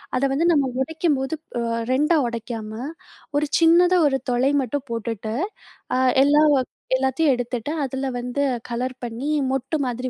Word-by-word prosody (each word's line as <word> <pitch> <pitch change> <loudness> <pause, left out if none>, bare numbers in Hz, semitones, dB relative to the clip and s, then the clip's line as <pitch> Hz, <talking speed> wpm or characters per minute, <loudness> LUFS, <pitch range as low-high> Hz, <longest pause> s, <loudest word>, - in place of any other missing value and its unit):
அத 255 - 0
வந்து 310 +5 +1
நம்ம 285 -5 +2
உடைக்கும்போது, 300 -1 0 0.2
அ - - -1 0.3
2 300 +5 +3
உடைக்காம, 230 -2 -5 0.7
ஒரு 300 - +1
சின்னதா 350 +2 +5
ஒரு 270 -1 0
துளை 250 +3 +2
மட்டும் 265 +2 -3
போட்டுட்டு, 225 -1 -3 0.6
அ - - +2 0.3
எல்லாவ் 295 0 +5 0.4
எல்லாத்தையும் 265 +3 +2
எடுத்துட்டு, 245 +2 -3
அதுல 265 +1 -3
வந்து 250 +3 -3 0.3
கலர் 255 +2 -2
பண்ணி 240 +5 -4 0.2
மொட்டு 270 +4 -2
மாதிரி 250 +1 -3
265 Hz, 135 wpm, -23 LUFS, 245-295 Hz, 0.7 s, சின்னதா